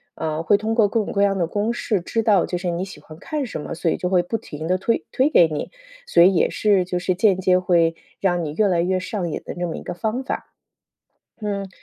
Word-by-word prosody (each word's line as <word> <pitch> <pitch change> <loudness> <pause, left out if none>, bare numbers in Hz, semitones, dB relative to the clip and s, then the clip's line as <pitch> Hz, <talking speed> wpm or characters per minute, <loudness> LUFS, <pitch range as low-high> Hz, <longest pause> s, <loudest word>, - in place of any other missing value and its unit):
呃， 160 +1 -3
会 205 - +4
通 220 +2 -2
过 220 -3 +4
各 220 +1 0
种 - - -5
各 200 - +2
样 195 -1 +2
的 170 - 0
公 210 +6 -1
式 215 -4 -1
知 225 +6 -1
道 210 -4 +3
就 180 - -3
是 180 0 -3
你 175 +2 -2
喜 190 -6 -11
欢 155 +1 -13
看 300 - -3
什 220 - -6
么， - - -6
所 170 0 -1
以 - - 0
就 180 - -2
会 180 -2 +3
不 225 +6 -2
停 155 -4 -7
地 185 +2 +2
推 230 +5 0
推 265 +3 +2
给 170 - +6
你， 155 -2 -4 0.3
所 170 - +4
以 185 +3 +7
也 - - +3
是 200 -4 +2
就 180 0 -2
是 180 0 0
间 195 -1 +3
接 185 -1 +3
会 170 -2 +2 0.2
让 175 -3 +1
你 150 - -4
越 210 +4 +2
来 175 -3 +2
越 185 +1 +1
上 185 -1 -3
瘾 - - -4
的 - - -7
那 175 - -1
么 165 - -4
一 - - -8
个 175 - -5
方 220 +7 -2
法。 - - -5 0.9
嗯。 200 -2 -3
185 Hz, 285 characters per minute, -22 LUFS, 175-210 Hz, 0.9 s, 以